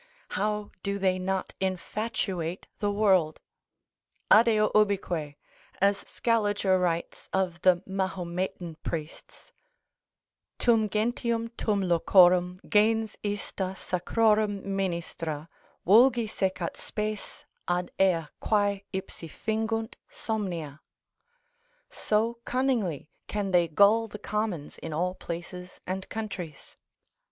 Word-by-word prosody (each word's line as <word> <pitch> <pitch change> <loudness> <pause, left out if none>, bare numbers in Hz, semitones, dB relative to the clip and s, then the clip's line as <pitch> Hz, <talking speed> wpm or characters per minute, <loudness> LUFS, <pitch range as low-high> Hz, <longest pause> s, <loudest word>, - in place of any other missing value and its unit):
How 210 +1 -1
do 200 0 -2
they 185 -1 +1
not 190 +1 -2
infatuate 190 -2 -2
the 205 - +1
world? 190 -7 +3 0.9
Adeo 215 -1 +6
ubique 180 -8 +1 0.4
(as 200 +1 +4
Scaliger 205 -5 +1
writes 170 -2 -2
of 185 -3 -1
the 185 -1 +4
Mahometan 185 -3 -3
priests), 155 -1 -7 1.1
tum 225 -3 +3
gentium 230 +2 0
tum 205 -3 0
locorum, 180 +1 +5
gens 220 +1 +3
ista 200 -2 -3
sacrorum 210 +2 +1
ministra, 170 -5 -3 0.4
vulgi 235 +4 +6
secat 190 -4 -2
spes, 210 -1 -5 0.2
ad 175 0 -1
ea 175 -4 +3
quae 205 -2 +1
ipsi 190 -3 -6
fingunt 225 - -2
somnia, 175 -10 -4 1.1
so 225 +2 0
cunningly 235 - -1 0.2
can 205 -2 -2
they 175 -2 +4
gull 205 +7 +4
the 210 - -8
commons 210 -8 -3
in 160 - -6
all 180 +4 0
places 180 +1 -7
and 190 +1 -4
countries. 195 -9 -6
195 Hz, 100 wpm, -28 LUFS, 175-215 Hz, 1.1 s, Adeo